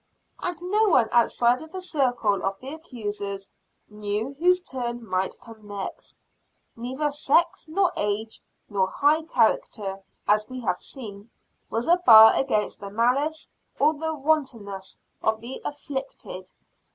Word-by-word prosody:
And 355 Hz, -2 st, -3 dB
no 420 Hz, +5 st, +2 dB
one 240 Hz, -10 st, +4 dB
outside 240 Hz, +1 st, +3 dB
of 315 Hz, -, -10 dB
the 375 Hz, -, -5 dB
circle 245 Hz, -, 0 dB
of 195 Hz, 0 st, -1 dB
the 270 Hz, +3 st, -7 dB
accusers 205 Hz, -, -5 dB, 0.4 s
knew 210 Hz, +4 st, -3 dB
whose 360 Hz, +2 st, +4 dB
turn 240 Hz, -7 st, -5 dB
might 185 Hz, 0 st, -1 dB
come 225 Hz, -3 st, -14 dB
next. 200 Hz, -1 st, -7 dB, 0.5 s
Neither 260 Hz, +6 st, -2 dB
sex, 330 Hz, +6 st, +2 dB
nor 360 Hz, +3 st, +1 dB
age, 210 Hz, +2 st, -2 dB, 0.3 s
nor 195 Hz, -3 st, +1 dB
high 290 Hz, +10 st, +2 dB
character, 215 Hz, -7 st, 0 dB, 0.3 s
as 215 Hz, +2 st, +3 dB
we 255 Hz, 0 st, -6 dB
have 185 Hz, -5 st, -1 dB
seen, 210 Hz, -4 st, -9 dB, 0.4 s
was 230 Hz, +2 st, -2 dB
a 345 Hz, +1 st, +6 dB
bar 220 Hz, -10 st, +9 dB
against 215 Hz, -6 st, 0 dB
the 200 Hz, -, -7 dB
malice, 265 Hz, +9 st, 0 dB, 0.3 s
or 300 Hz, +2 st, +4 dB
the 320 Hz, +1 st, -3 dB
wantonness 260 Hz, -10 st, -2 dB, 0.2 s
of 220 Hz, 0 st, +1 dB
the 235 Hz, +4 st, -7 dB
"afflicted." 265 Hz, -10 st, -6 dB
240 Hz, 140 wpm, -25 LUFS, 210-300 Hz, 0.5 s, bar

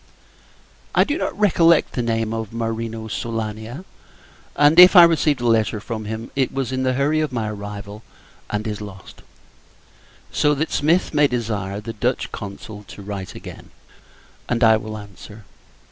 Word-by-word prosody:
I -, -, +6 dB
do 290 Hz, -, -2 dB
not -, -, -3 dB
recollect 170 Hz, -5 st, +4 dB
the 125 Hz, -, -1 dB
name 115 Hz, -1 st, -1 dB
of 115 Hz, -2 st, -4 dB
Marino 115 Hz, -1 st, -4 dB
Soolania; 110 Hz, -, -5 dB, 0.7 s
and, 145 Hz, +3 st, +5 dB
if 180 Hz, +2 st, +10 dB
I 175 Hz, -, +11 dB
received 155 Hz, -5 st, +3 dB
a -, -, -2 dB
letter 110 Hz, -2 st, +2 dB
from 110 Hz, 0 st, -6 dB
him, 110 Hz, +2 st, -6 dB
it 135 Hz, -2 st, +1 dB
was 135 Hz, -2 st, -3 dB
in 130 Hz, 0 st, -2 dB
the 130 Hz, 0 st, +1 dB
hurry 145 Hz, +4 st, +1 dB
of 155 Hz, -2 st, -2 dB
my 115 Hz, -3 st, -2 dB
arrival, 105 Hz, 0 st, -8 dB, 0.5 s
and 105 Hz, +1 st, -3 dB
is 105 Hz, -1 st, -4 dB
lost: 100 Hz, -2 st, -11 dB, 1.1 s
so 150 Hz, 0 st, +2 dB
that 155 Hz, +3 st, -2 dB
Smith 165 Hz, +5 st, +1 dB
may 150 Hz, -1 st, +4 dB
desire 105 Hz, -6 st, -3 dB
the 115 Hz, +2 st, -7 dB
Dutch 120 Hz, +4 st, -2 dB
Consul 105 Hz, +1 st, -8 dB
to -, -, -11 dB
desire -, -, -13 dB
him 100 Hz, -, -10 dB
to -, -, -10 dB
write 100 Hz, -2 st, -6 dB
again, -, -, -10 dB, 0.8 s
and 120 Hz, 0 st, +1 dB
I 110 Hz, -1 st, +7 dB
will 110 Hz, 0 st, -5 dB
answer. 105 Hz, +1 st, -12 dB
115 Hz, 175 wpm, -21 LUFS, 105-135 Hz, 1.1 s, I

